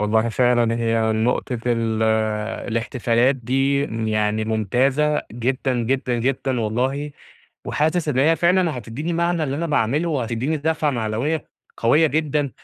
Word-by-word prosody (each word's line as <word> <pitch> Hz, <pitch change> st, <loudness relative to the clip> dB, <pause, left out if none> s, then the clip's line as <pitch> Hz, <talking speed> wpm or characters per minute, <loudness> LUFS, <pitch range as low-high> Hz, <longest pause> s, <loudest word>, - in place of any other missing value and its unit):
والله 110 Hz, +2 st, +2 dB
فعلًا 120 Hz, -1 st, +2 dB
هي 115 Hz, -1 st, +1 dB
نقطة 120 Hz, +2 st, 0 dB
ال 115 Hz, -2 st, 0 dB, 0.7 s
الاحتفالات 120 Hz, +2 st, +1 dB
دي 135 Hz, +3 st, +1 dB, 0.3 s
يعني 110 Hz, 0 st, 0 dB
ممتازة 130 Hz, +8 st, +1 dB
جدًا، 130 Hz, +3 st, -1 dB
جدًا، 125 Hz, +1 st, 0 dB
جدًا 130 Hz, 0 st, -1 dB
والله، 130 Hz, +7 st, -1 dB, 0.6 s
وحاسس 160 Hz, +2 st, 0 dB
إن 135 Hz, -4 st, 0 dB
هي 160 Hz, +4 st, +4 dB
فعلًا 175 Hz, -4 st, +2 dB
هتدّيني 125 Hz, +9 st, -5 dB
معنى 170 Hz, -1 st, 0 dB
اللي 140 Hz, -1 st, -2 dB
أنا 170 Hz, +3 st, -2 dB
باعمله، 150 Hz, +2 st, +1 dB
وهتدّيني 130 Hz, +2 st, -1 dB
دَفعة 155 Hz, 0 st, 0 dB
معنوية 120 Hz, +6 st, -2 dB, 0.3 s
قوية 150 Hz, +8 st, +4 dB
جدًا، 150 Hz, -2 st, 0 dB
130 Hz, 130 wpm, -21 LUFS, 115-150 Hz, 0.7 s, هي